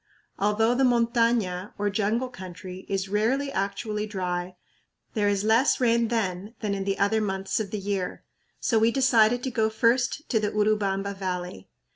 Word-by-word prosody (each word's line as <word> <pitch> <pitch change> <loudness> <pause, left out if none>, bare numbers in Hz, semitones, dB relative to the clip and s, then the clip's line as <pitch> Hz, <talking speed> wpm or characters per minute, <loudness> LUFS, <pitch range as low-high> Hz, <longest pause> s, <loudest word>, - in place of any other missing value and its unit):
Although 210 +3 +2
the 265 +2 +1
montaña, 230 -6 +1
or 205 -1 0
jungle 220 +5 0
country, 185 -3 -9
is 195 0 -1
rarely 235 +8 0
actually 210 +1 -2
dry, 180 -2 -3 0.6
there 205 -3 +1
is 200 0 0
less 225 +5 +3
rain 235 -2 +3
then 210 -2 -2
than 210 -2 -2
in 195 -1 -3
the 195 0 -1
other 210 +2 +2
months 195 -1 -1
of 210 -3 -3
the 210 - -3
year; 195 -2 -3 0.4
so 225 - +2
we 225 +1 +4
decided 245 -2 +3
to 260 - -2
go 220 -2 +1
first 245 +6 +1
to 225 - +2
the 210 -1 0
Urubamba 200 -2 0
Valley. 180 - -5
210 Hz, 165 wpm, -26 LUFS, 195-230 Hz, 0.6 s, we